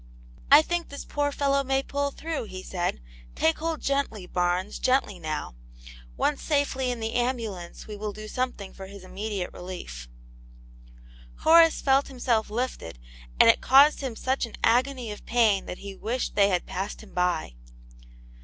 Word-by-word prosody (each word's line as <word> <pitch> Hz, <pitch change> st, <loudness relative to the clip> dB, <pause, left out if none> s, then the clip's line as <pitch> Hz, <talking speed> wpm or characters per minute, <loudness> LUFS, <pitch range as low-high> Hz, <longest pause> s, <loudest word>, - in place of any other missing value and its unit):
" -, -, -22 dB
I 295 Hz, +2 st, +9 dB
think 345 Hz, +1 st, -2 dB
this 280 Hz, -, -8 dB
poor 290 Hz, 0 st, -1 dB
fellow 275 Hz, -1 st, +1 dB
may 270 Hz, 0 st, 0 dB
pull 285 Hz, +1 st, -1 dB
through," 315 Hz, -2 st, -4 dB
he 185 Hz, -3 st, -8 dB
said, 175 Hz, -, -2 dB, 0.3 s
*'take 160 Hz, -, +2 dB
hold 325 Hz, -1 st, -2 dB
gently, 275 Hz, -8 st, -1 dB
Barnes, 180 Hz, +2 st, -1 dB
gently 255 Hz, -7 st, +1 dB
now; 155 Hz, -, -4 dB, 0.6 s
once 295 Hz, -, 0 dB
safely 280 Hz, -3 st, 0 dB
in 245 Hz, -1 st, -3 dB
the 225 Hz, 0 st, -3 dB
ambulance 230 Hz, -8 st, -3 dB
we 210 Hz, -, -7 dB
will 210 Hz, 0 st, -4 dB
do 215 Hz, +1 st, -9 dB
something 250 Hz, -5 st, -3 dB
for 190 Hz, -, -9 dB
his 200 Hz, -1 st, -11 dB
immediate 200 Hz, 0 st, -4 dB
relief." 65 Hz, -, -8 dB, 1.3 s
Horace 330 Hz, 0 st, +6 dB
felt 270 Hz, 0 st, +3 dB
himself 245 Hz, -5 st, 0 dB
lifted, 225 Hz, -, -4 dB, 0.4 s
and -, -, +8 dB
it -, -, +5 dB
caused 280 Hz, +3 st, +6 dB
him 260 Hz, -4 st, -4 dB
such 260 Hz, +1 st, -1 dB
an 225 Hz, -, -11 dB
agony 250 Hz, 0 st, +2 dB
of 210 Hz, -, -9 dB
pain 225 Hz, -5 st, +3 dB
that 180 Hz, -, -5 dB
he 200 Hz, -1 st, -8 dB
wished 235 Hz, +6 st, -3 dB
they 200 Hz, -1 st, +4 dB
had 180 Hz, -2 st, 0 dB
passed 195 Hz, +4 st, -5 dB
him 215 Hz, -, -16 dB
by. 180 Hz, -, 0 dB
230 Hz, 165 wpm, -26 LUFS, 190-275 Hz, 1.3 s, I